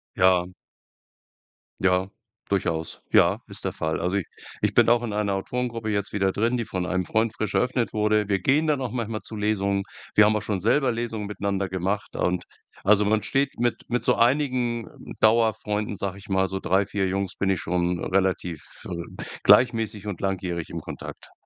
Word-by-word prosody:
Ja. 90 -1 +3 1.3
Ja, 95 0 +2 0.4
durchaus. 85 -5 -1
Ja, - - +5
ist - - -5
der - - -1
Fall. 80 0 -2
Also 90 +3 0
i 100 - 0 0.4
ich - - +1
bin - - +5
auch 120 0 +4
in 115 -3 -3
einer 105 -1 0
Autorengruppe 115 +2 -3
jetzt 100 -1 -1
wieder 95 -2 +1
drin, 115 +5 +1
die 120 - -1
von 95 -4 -2
einem 95 0 0
Freund 110 0 +1
frisch 110 -2 -3
eröffnet 125 -1 +1
wurde. 105 -1 +2
Wir 100 -1 +2
gehen 145 - +3
dann 150 -3 +1
auch 130 -3 -2
manchmal 115 -3 -3
zu 110 - -8
Lesungen. 100 -2 0 0.3
Wir 110 - +7
haben 110 0 +3
auch 105 - -2
schon 100 -3 -2
selber 125 +6 +2
Lesungen 115 -2 -3
miteinander 100 -1 -2
gemacht. 95 +2 -2
Und 90 -1 0 0.4
also, 105 +1 +5
man 105 +1 +2
steht 140 0 0
mit 120 0 0
mit 120 -1 0
so - - +4
einigen 120 -2 +1 0.3
Dauerfreunden, 110 -2 +2
sage 100 0 -3
ich 100 - -14
mal, 95 -1 +2
so 95 - -3
3, 95 +2 +2
4 100 0 -2
Jungs 95 0 -2
bin 95 - 0
ich 95 - +1
schon 90 0 -1
relativ, 95 -4 0 0.2
äh, 85 -1 -6 0.2
gleichmäßig 115 -4 +4
und 100 -5 -4
langjährig 90 -4 -2
im - - -4
Kontakt. - - -8
105 Hz, 185 wpm, -25 LUFS, 95-115 Hz, 1.3 s, Wir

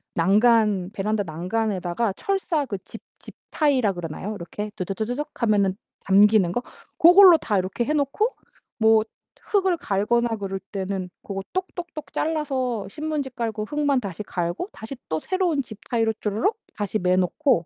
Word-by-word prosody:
난간 205 +1 +3
베란다 210 0 -1
난간에다가 190 +3 -1
철사 360 - -1
그 205 -7 -5
집 225 - -11 0.2
집타이라 265 -9 0
그러나요? 175 +4 -5
이렇게 205 +4 -6
두두두두둑 220 +10 -3
하면은 200 -4 +3 0.3
잠기는 200 -1 +5
거? 245 +7 -2 0.3
고걸로 355 0 +9
다 210 -8 -1
이렇게 190 +6 -2
해 300 - 0
놓고 305 - 0 0.4
뭐 220 -1 +5 0.4
흙을 380 -4 +1
갈거나 235 +3 +1
그럴 195 -1 -4
때는 190 -2 -3
고거 195 -1 -5
똑똑똑 350 -4 -5
잘라서 260 -9 -1
신문지 300 +2 -3
깔고 225 -3 -3
흙만 290 +1 +1
다시 200 -1 -5
갈고 175 - -3
다시 225 +5 -8
또 155 - 0
새로운 360 - 0
집타이로 225 -1 -2
쪼르륵 220 - 0 0.2
다시 205 0 -2
매어 180 0 +2
놓고 185 - +2
220 Hz, 325 characters per minute, -24 LUFS, 195-285 Hz, 0.4 s, 고걸로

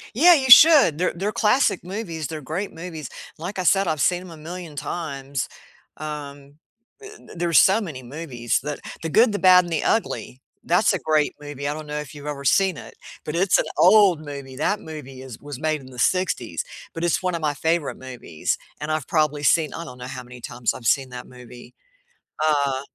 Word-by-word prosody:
Yeah, 345 +8 +7
you 265 -4 0
should, 280 - +8
they're 180 - +1
they're 195 +5 -2
classic 215 -1 +2
movies, 175 -5 -5
they're 160 -1 -6
great 165 +9 -4
movies, 160 -4 -8 0.3
like 180 +5 -6
I 185 - -1
said, 195 +2 +3
I've 155 -2 -1
seen 180 +4 +2
'em 185 - -11
a 165 - -11
million 165 0 -8
times, 140 -4 -4 0.5
um, 145 -1 -8 0.4
i 410 - -10
d - - -15
there's 170 -2 +1
so 195 +4 +5
many 150 -10 -7
movies, 125 -3 -3
that 150 0 -5 0.2
The 165 - -3
Good, 225 +8 +4
The 205 - -2
Bad, 185 -1 +7
and 170 - -5
The 155 - -1
Ugly, 215 - -1 0.2
that's 180 +5 +3
a 190 - -1
great 155 -2 +1
movie, 145 -1 -6
I 145 - -1
don't 155 0 -8
know 150 0 -4
if 150 -3 -8
you've 145 0 -10
ever 145 -2 -5
seen 190 +4 +3
it, - - -11 0.3
but 150 - -4
it's 185 +2 +3
an - - 0
old 185 -4 +5
movie, 140 -3 -8
that 200 +8 0
movie 135 -4 -9
is 130 -4 -10
was 145 -3 -8
made 155 -1 -1
in 130 - -13
the 125 - -13
'60s, 185 +6 0 0.3
but 165 - -5
it's 175 +1 +1
one 180 -1 0
of 170 - -3
my 150 -2 -1
favorite 160 0 -1
movies, 125 -11 -4 0.2
and 150 +1 -4
I've 155 -4 -2
probably 150 -2 +1
seen 155 +1 +2
I 165 - -6
don't 125 -6 -10
know 125 - -8
how 130 0 -7
many 125 0 -13
times 120 0 -2
I've 120 - -11
seen 130 +3 +2
that 125 0 -8
movie, 125 -1 -13 0.7
uh 140 -3 +1
155 Hz, 210 wpm, -23 LUFS, 140-180 Hz, 0.7 s, should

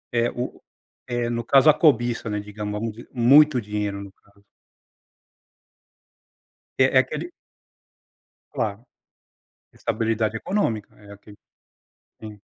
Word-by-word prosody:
É, 115 0 +2
o 125 +1 -6 0.5
é, 120 -1 -2
no 120 0 -2
caso 135 +5 +5
a - - -1
cobiça, 120 -7 +2
né, 105 0 -2
digamos, 105 0 -6
vamos 110 +2 -3
dizer. 120 - -13
Muito 135 +3 +5
dinheiro, 105 -2 -3
no 100 -1 -10
caso. 100 0 -29 2.3
É, - - +3
é - - +9
aquele - - -3 1.2
Claro. 105 +3 -3 0.9
Estabilidade 110 0 -1
econômica, 110 - -2
é, 100 -1 -14
aqui 100 +1 -15 0.8
sim. 105 -2 -10
110 Hz, 115 wpm, -23 LUFS, 105-120 Hz, 2.3 s, é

